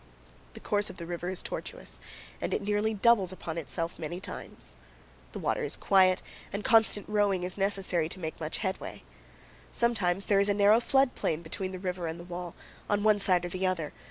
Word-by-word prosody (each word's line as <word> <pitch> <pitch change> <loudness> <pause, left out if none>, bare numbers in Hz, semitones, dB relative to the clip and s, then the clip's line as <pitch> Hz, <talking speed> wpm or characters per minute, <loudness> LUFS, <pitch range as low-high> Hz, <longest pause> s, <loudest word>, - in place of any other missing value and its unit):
The - - -9
course 205 0 0
of - - -10
the 170 - -6
river 175 +1 -4
is 185 0 -4
tortuous, - - -6 0.4
and - - 0
it - - -2
nearly 210 +2 +1
doubles 205 -3 +4
upon 170 -3 -5
itself 165 +2 -3
many 165 +3 -4
times. - - -8 0.6
The - - -7
water - - -1
is - - -2
quiet, 185 -1 +4 0.3
and 200 +1 -3
constant 220 -2 +4
rowing 205 -3 +2
is 180 0 -2
necessary 195 -5 0
to 185 - -7
make 160 -2 -5
much 155 0 -3
headway. 190 0 -4 0.7
Sometimes 200 -6 +1
there 200 -1 +4
is 200 +1 +2
a 200 - +3
narrow 205 +2 +6
flood 270 +2 +3
plain 160 +2 -1
between 185 +3 -4
the 185 - -5
river 180 -2 -3
and 160 +1 -5
the - - -8
wall, 175 -1 -6 0.3
on 205 0 +2
one 215 -1 +5
side 180 -3 +2
or - - -3
the 185 +1 -1
other. 165 -5 -2
185 Hz, 200 wpm, -29 LUFS, 175-205 Hz, 0.7 s, narrow